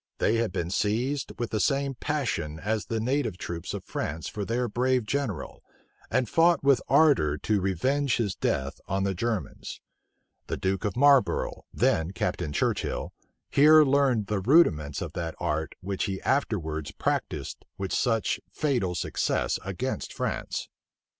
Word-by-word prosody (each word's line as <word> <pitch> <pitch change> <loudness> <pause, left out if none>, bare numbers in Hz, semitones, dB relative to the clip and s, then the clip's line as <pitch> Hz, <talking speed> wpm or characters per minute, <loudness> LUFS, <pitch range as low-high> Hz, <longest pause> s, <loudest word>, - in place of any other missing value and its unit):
They 115 - +2
had 115 -4 0
been 85 0 -3
seized 120 +8 0
with 120 - -3
the 110 - 0
same 140 +3 +1
passion 120 - -2
as 110 +2 -2
the 115 - -1
native 120 -4 0
troops 85 -3 -5
of - - -5
France 80 +2 -4
for 105 - -4
their 120 +4 -1
brave 125 +1 +1
general, 110 - -3 0.5
and 125 - +1
fought 165 +6 +3
with 140 -3 +4
ardor 135 - +4
to 105 +5 0
revenge 130 - +1
his 105 -5 0
death 70 -5 -2
on 95 +1 0
the 100 0 0
Germans. 110 +2 -3 0.7
The - - -2
duke 95 +3 -1
of 105 +2 -2
Marlborough, 140 -1 +3
then 80 +3 +1
Captain 90 -3 -2
Churchill, 75 - -1 0.4
here 155 +2 +7
learned 135 -6 +2
the 105 0 -1
rudiments 90 - +3
of - - -7
that 85 -2 -4
art 80 +1 -2
which 95 +1 -2
he 95 -2 -3
afterwards 80 - -1
practised - - -3
with 95 -1 -3
such 115 -4 +1
fatal 120 - 0
success - - 0
against - - -4
France. - - -3
110 Hz, 150 wpm, -27 LUFS, 90-135 Hz, 0.7 s, here